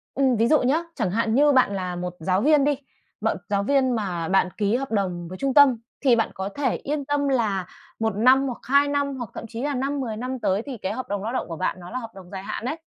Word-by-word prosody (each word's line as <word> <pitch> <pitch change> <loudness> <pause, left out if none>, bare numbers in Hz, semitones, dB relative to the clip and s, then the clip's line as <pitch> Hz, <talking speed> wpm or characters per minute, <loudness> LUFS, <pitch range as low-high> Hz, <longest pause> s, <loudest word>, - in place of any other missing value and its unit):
Ừm, 265 -2 +3
ví 225 +2 +3
dụ 310 - +5
nhá, 285 +7 +2
chẳng 180 - -1
hạn 225 +2 +1
như 290 +2 +5
bạn 255 -7 +3
là 180 -2 -3
một 180 0 -4
giáo 185 +4 +1
viên 300 +2 +4
đi, 290 0 +2 0.4
bạn - - 0
giáo 200 -1 +1
viên 265 +2 +2
mà 180 -6 -2
bạn 190 -1 +3
ký 205 +1 +1
hợp 270 0 -3
đồng 180 -5 -1
với 185 +2 -8
trung 275 -1 -1
tâm 280 -4 +7 0.2
thì 260 -4 +5
bạn 225 - +1
có 190 +1 -4
thể 260 +3 -1
yên 285 -1 -3
tâm 290 0 0
là 215 -8 +1 0.3
1 220 -2 0
năm 260 +5 +5
hoặc 245 - -4
2 280 +3 +4
năm, 285 -1 -1
hoặc 240 -4 -6
thậm - - -7
chí 230 +2 -6
là 290 -1 -1
5-10 265 -4 -2
năm 255 +2 -4
tới 195 -2 +1
thì 270 -4 -6
cái 190 - -3
hợp 255 - -5
đồng 200 -1 -2
lao 225 +3 -3
động - - -2
của 165 - -5
bạn 185 - -1
nó 175 0 -10
là 255 - -3
hợp 230 -3 -7
đồng 185 -2 -12
dài 190 -1 -6
hạn 225 - -5
ấy, 305 +6 -2
235 Hz, 270 wpm, -24 LUFS, 195-275 Hz, 0.4 s, tâm